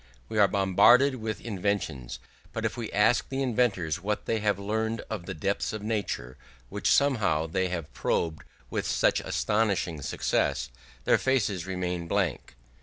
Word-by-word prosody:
We 110 Hz, -, -1 dB
are 100 Hz, -, +7 dB
bombarded 120 Hz, +8 st, +5 dB
with 110 Hz, -2 st, -4 dB
inventions; 95 Hz, -, -2 dB, 0.4 s
but -, -, -3 dB
if -, -, -1 dB
we 115 Hz, -3 st, -5 dB
ask 105 Hz, 0 st, +3 dB
the 135 Hz, 0 st, -1 dB
inventors 105 Hz, -, 0 dB
what 105 Hz, +2 st, -2 dB
they 115 Hz, -, 0 dB
have 105 Hz, -2 st, +1 dB
learned 110 Hz, +2 st, -2 dB
of 100 Hz, -6 st, -4 dB
the -, -, -4 dB
depths 100 Hz, +7 st, -1 dB
of 110 Hz, -1 st, -5 dB
nature, 100 Hz, -, -3 dB, 0.3 s
which -, -, -1 dB
somehow 105 Hz, -, +3 dB
they 95 Hz, +3 st, 0 dB
have 80 Hz, -6 st, -5 dB
probed 80 Hz, +1 st, -1 dB, 0.3 s
with -, -, -2 dB
such -, -, +2 dB
astonishing 100 Hz, -7 st, 0 dB
success, 65 Hz, -1 st, 0 dB, 0.3 s
their -, -, +4 dB
faces 105 Hz, -9 st, 0 dB
remain 90 Hz, -2 st, -3 dB
blank. 90 Hz, -7 st, -1 dB
100 Hz, 155 wpm, -28 LUFS, 85-110 Hz, 0.4 s, are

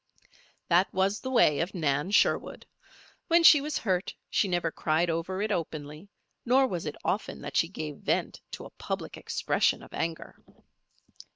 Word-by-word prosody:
That 180 Hz, +3 st, +3 dB
was 195 Hz, +2 st, 0 dB
the 260 Hz, -, -5 dB
way 235 Hz, -, +4 dB
of 175 Hz, +4 st, -2 dB
Nan 150 Hz, 0 st, 0 dB
Sherwood. 205 Hz, -, +1 dB, 0.6 s
When 335 Hz, 0 st, +4 dB
she 305 Hz, -4 st, +8 dB
was 300 Hz, +1 st, -2 dB
hurt 185 Hz, -3 st, -1 dB, 0.2 s
she 205 Hz, -, +2 dB
never 175 Hz, -3 st, -1 dB
cried 165 Hz, +2 st, 0 dB
over 185 Hz, +4 st, -2 dB
it 215 Hz, -, -1 dB
openly; 155 Hz, -1 st, -5 dB, 0.3 s
nor 260 Hz, +3 st, +4 dB
was 175 Hz, -10 st, -4 dB
it 150 Hz, -, -4 dB
often 205 Hz, -, -2 dB
that 145 Hz, -1 st, -7 dB
she 165 Hz, -, +3 dB
gave 155 Hz, -5 st, -6 dB
vent -, -, -2 dB
to -, -, -7 dB
a -, -, -11 dB
public -, -, -4 dB
expression -, -, 0 dB
of -, -, -15 dB
anger. 165 Hz, -1 st, -5 dB
180 Hz, 165 wpm, -28 LUFS, 160-210 Hz, 0.6 s, she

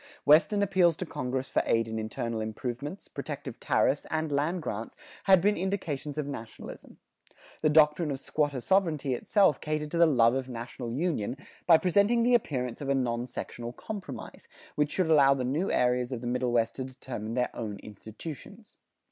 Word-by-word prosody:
Western 185 Hz, +7 st, +5 dB
appeals 185 Hz, -4 st, +3 dB
to 185 Hz, -, -4 dB
Congress 130 Hz, -3 st, -3 dB
for -, -, +3 dB
aid 115 Hz, 0 st, +2 dB
in 110 Hz, 0 st, -3 dB
internal 110 Hz, +1 st, -3 dB
improvements, 125 Hz, -, -5 dB
protective -, -, -6 dB
tariffs, -, -, +1 dB
and 160 Hz, -1 st, -1 dB
land 150 Hz, +6 st, 0 dB
grants 110 Hz, -2 st, -5 dB, 0.3 s
had 190 Hz, -2 st, +6 dB
been 205 Hz, +3 st, +3 dB
indications 160 Hz, -6 st, -3 dB
of 150 Hz, -, -1 dB
nationalism. 115 Hz, -6 st, -9 dB, 0.6 s
The 155 Hz, -, +3 dB
doctrine 150 Hz, +1 st, +4 dB
of 135 Hz, -2 st, -3 dB
squatter 145 Hz, -3 st, -1 dB
sovereignty 155 Hz, -6 st, +1 dB
itself 190 Hz, -, +2 dB
catered 150 Hz, 0 st, -2 dB
to 170 Hz, -, -1 dB
the 170 Hz, -, +7 dB
love 120 Hz, -5 st, +4 dB
of 130 Hz, 0 st, -2 dB
national 120 Hz, 0 st, -6 dB
union 135 Hz, -, -1 dB, 0.3 s
by 165 Hz, -2 st, +8 dB
presenting 200 Hz, +7 st, +3 dB
the 245 Hz, +1 st, +3 dB
appearance 130 Hz, -, 0 dB
of 140 Hz, -, -4 dB
a 140 Hz, -, +3 dB
non 120 Hz, -2 st, -1 dB
sectional 120 Hz, -1 st, -6 dB
compromise, 205 Hz, -, -8 dB, 0.3 s
which 150 Hz, 0 st, 0 dB
should 185 Hz, -, +1 dB
allow 140 Hz, -4 st, +6 dB
the 130 Hz, -, -2 dB
new 150 Hz, +10 st, 0 dB
areas 125 Hz, 0 st, +1 dB
of 125 Hz, -3 st, -4 dB
the -, -, -7 dB
Middle 125 Hz, 0 st, 0 dB
West 115 Hz, -1 st, +1 dB
to 130 Hz, -, -2 dB
determine 125 Hz, -4 st, -6 dB
their 125 Hz, -1 st, -1 dB
own 105 Hz, -4 st, -4 dB
institutions. 150 Hz, -, -10 dB
140 Hz, 175 wpm, -29 LUFS, 120-165 Hz, 0.6 s, by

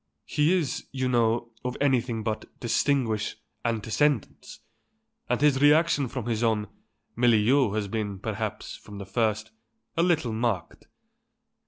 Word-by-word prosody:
He 150 Hz, +3 st, +2 dB
is, 165 Hz, -8 st, -1 dB
you 130 Hz, -1 st, -1 dB
know, 120 Hz, -1 st, +1 dB
of 125 Hz, 0 st, -3 dB
anything 125 Hz, -5 st, +1 dB
but 110 Hz, -1 st, -2 dB
distinguished 120 Hz, -2 st, 0 dB, 0.3 s
antecedents, 115 Hz, +4 st, -1 dB, 0.7 s
and 125 Hz, -, +1 dB
his 140 Hz, -2 st, +3 dB
reaction 150 Hz, -1 st, +4 dB
from 125 Hz, -2 st, -5 dB
his 115 Hz, -2 st, -1 dB
own 110 Hz, -3 st, +1 dB, 0.5 s
milieu 120 Hz, 0 st, +3 dB
has 105 Hz, -2 st, -1 dB
been, 105 Hz, -1 st, -3 dB
perhaps, -, -, -4 dB
from 105 Hz, -, -11 dB
the 100 Hz, -, -6 dB
first, 110 Hz, +1 st, -1 dB, 0.4 s
a 165 Hz, -, +2 dB
little 160 Hz, -9 st, +1 dB
marked. 110 Hz, -6 st, -2 dB
120 Hz, 130 wpm, -27 LUFS, 110-135 Hz, 0.7 s, reaction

